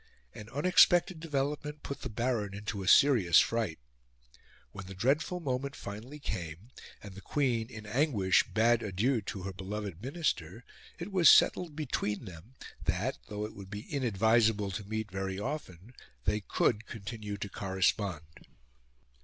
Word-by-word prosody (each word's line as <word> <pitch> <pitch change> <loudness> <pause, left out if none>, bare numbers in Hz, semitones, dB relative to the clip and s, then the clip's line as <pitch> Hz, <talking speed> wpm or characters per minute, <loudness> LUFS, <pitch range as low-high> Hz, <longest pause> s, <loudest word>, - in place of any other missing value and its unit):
An 105 0 -10
unexpected 175 +3 +4
development 150 -1 -3
put 140 - -6
the 125 - -4
Baron 110 -3 -1
into 105 0 -4
a 95 - -5
serious 110 - +6
fright. 115 -8 0 0.9
When 95 -2 -9
the 95 - -8
dreadful 145 - +1
moment 140 -2 -3
finally 110 +8 -8
came, 95 - -6 0.3
and 100 -2 -9
the 100 - -10
Queen, 120 -5 0
in 110 -4 -9
anguish, 105 -5 +3
bade 115 +1 +3
adieu 110 +5 0
to 95 -1 -6
her 95 0 -5
beloved 100 -1 -5
Minister, 125 - -2 0.3
it 175 +4 -6
was 180 -5 +6
settled 170 -5 +5
between 125 -8 -2
them 95 +7 -12 0.3
that, 95 +10 -1
though 105 -1 -4
it 105 - -8
would 100 -1 -10
be 105 +1 -6
inadvisable 110 -4 +2
to 100 +3 -4
meet 110 -2 -3
very 95 0 -3
often, 110 - -6 0.3
they 105 - +2
could 105 +1 0
continue 105 -1 -6
to 100 - -4
correspond. 95 -3 0
110 Hz, 145 wpm, -31 LUFS, 100-135 Hz, 0.9 s, serious